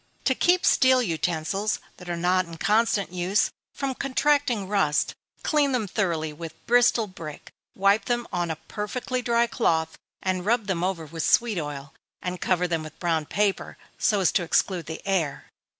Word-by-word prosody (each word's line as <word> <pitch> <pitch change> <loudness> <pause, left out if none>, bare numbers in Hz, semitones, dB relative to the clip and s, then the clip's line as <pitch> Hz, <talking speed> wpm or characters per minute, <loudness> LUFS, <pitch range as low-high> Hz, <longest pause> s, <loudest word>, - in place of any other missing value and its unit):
To 260 - +3
keep 355 +6 +3
steel 260 -1 +5
utensils 175 +3 -1 0.2
(that 180 -1 -10
are 175 - -2
not 180 +2 +2
in 165 -1 -10
constant 205 0 +1
use) 180 +3 +1 0.2
from 275 -1 -3
contracting 275 -5 +1
rust, 185 -8 +1 0.3
clean 290 -3 +2
them 230 -5 0
thoroughly 170 -6 -1
with 160 +1 -8
Bristol 240 -1 +4
brick, 165 -6 -9 0.2
wipe 200 +2 +3
them 240 -1 -1
on 175 -1 0
a 160 - -1
perfectly 240 - -4
dry 235 -1 +2
cloth, 160 -9 0 0.2
and 185 -1 0
rub 225 +2 +1
them 185 -4 -1
over 180 -3 -1
with 165 +2 -6
sweet 220 +2 +3
oil, 145 -2 -6 0.3
and 180 -1 -5
cover 180 -1 +1
them 165 -2 -1
with 155 0 -10
brown 165 -4 0
paper, 205 -1 -1 0.2
so 205 -3 +2
as 180 - +3
to 195 - +2
exclude 175 +1 0
the 160 - -6
air. 165 -8 -1
190 Hz, 170 wpm, -25 LUFS, 165-230 Hz, 0.3 s, steel